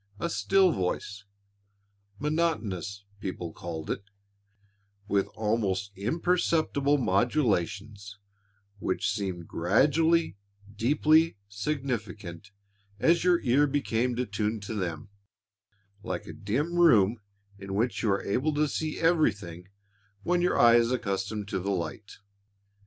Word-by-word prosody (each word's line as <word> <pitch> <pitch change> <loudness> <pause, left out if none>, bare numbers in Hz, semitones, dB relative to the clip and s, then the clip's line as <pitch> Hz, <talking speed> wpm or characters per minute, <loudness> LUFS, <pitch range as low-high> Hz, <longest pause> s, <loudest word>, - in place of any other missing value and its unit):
A 170 - -2
still 195 0 +3
voice 100 +1 -3 0.9
monotonous, 110 - -2 0.2
people 90 -4 -5
called 80 -2 -6
it 100 - -4 1.0
with 100 -1 +1
almost 105 -3 -1
imperceptible 145 - +1
modulations 100 - 0 0.6
which 95 - -1
seemed 95 -5 -4
gradually 150 - +2 0.4
deeply 150 +5 +3
significant 105 - -4 0.5
as 165 +9 +3
your 180 -1 +3
ear 140 +4 +3
became 125 -4 0
attuned 105 -2 -2
to 105 - -5
them, 90 -4 -4 0.9
like 115 - -4
a - - -8
dim 140 +12 -2
room 115 - +5 0.4
in 95 0 -6
which 115 +4 0
you 110 - +1
are 100 0 +1
able 135 +9 0
to 150 +1 +2
see 155 +1 -3
everything 105 - +1 0.6
when 175 0 +1
your 180 - +2
eye 120 0 +7
is 120 0 +2
accustomed 100 -3 -2
to 95 - -1
the 95 +2 -3
light. 95 +3 -4
110 Hz, 115 wpm, -28 LUFS, 100-150 Hz, 1.0 s, eye